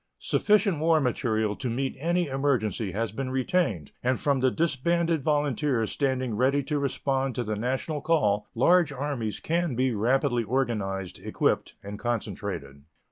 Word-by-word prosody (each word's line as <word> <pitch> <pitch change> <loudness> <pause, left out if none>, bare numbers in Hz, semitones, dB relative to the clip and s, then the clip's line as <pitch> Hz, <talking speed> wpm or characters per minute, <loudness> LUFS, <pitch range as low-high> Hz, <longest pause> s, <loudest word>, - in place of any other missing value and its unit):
Sufficient 205 -6 +2
war 160 0 +4
material 110 -5 0
to 130 - -3
meet 130 +3 -2
any 175 +4 +1
emergency 125 - 0
has 110 +3 -2
been 130 +4 -4
retained, 130 - 0
and 125 0 +1
from 140 -2 +1
the 130 0 +3
disbanded 165 +2 +1
volunteers 145 -5 0
standing 130 -5 -1
ready 135 +5 +2
to 150 +1 -1
respond 135 -1 -1
to 125 - -1
the 110 -1 -2
national 130 +7 -2
call 105 -11 +1
large 170 +6 +4
armies 135 -6 -3
can 170 -4 -1
be 130 0 +1
rapidly 120 +3 +1
organized, 105 -6 -2
equipped, - - -1
and 100 +1 -7
concentrated. 70 - -4
130 Hz, 145 wpm, -27 LUFS, 115-150 Hz, -, war